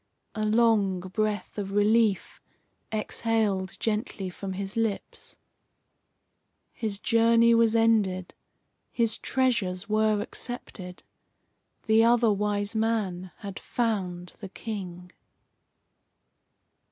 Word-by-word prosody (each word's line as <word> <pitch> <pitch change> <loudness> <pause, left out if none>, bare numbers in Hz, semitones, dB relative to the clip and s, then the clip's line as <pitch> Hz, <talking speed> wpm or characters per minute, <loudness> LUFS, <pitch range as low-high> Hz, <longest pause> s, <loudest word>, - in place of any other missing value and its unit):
A 215 - -3
long 215 -4 +3
breath 205 +3 -3
of 195 -1 -4
relief 210 -1 +2 0.5
exhaled 215 -3 -1
gently 210 -4 -2
from 190 +1 -6
his 195 +1 -5
lips. 225 -3 -3 1.4
His 215 -3 -3
journey 230 +2 +4
was 230 -1 +4
ended. 210 -5 +2 0.6
His 230 -2 +1
treasures 230 -8 0
were 215 0 +2
accepted. 205 -5 -7 0.8
The 220 0 +5
Other 235 -2 +4
Wise 205 +1 -1
Man 210 -5 -1
had 200 -3 -7
found 185 -7 -2
the 195 -4 -8
King. 185 -4 -7
210 Hz, 90 wpm, -27 LUFS, 195-225 Hz, 1.4 s, The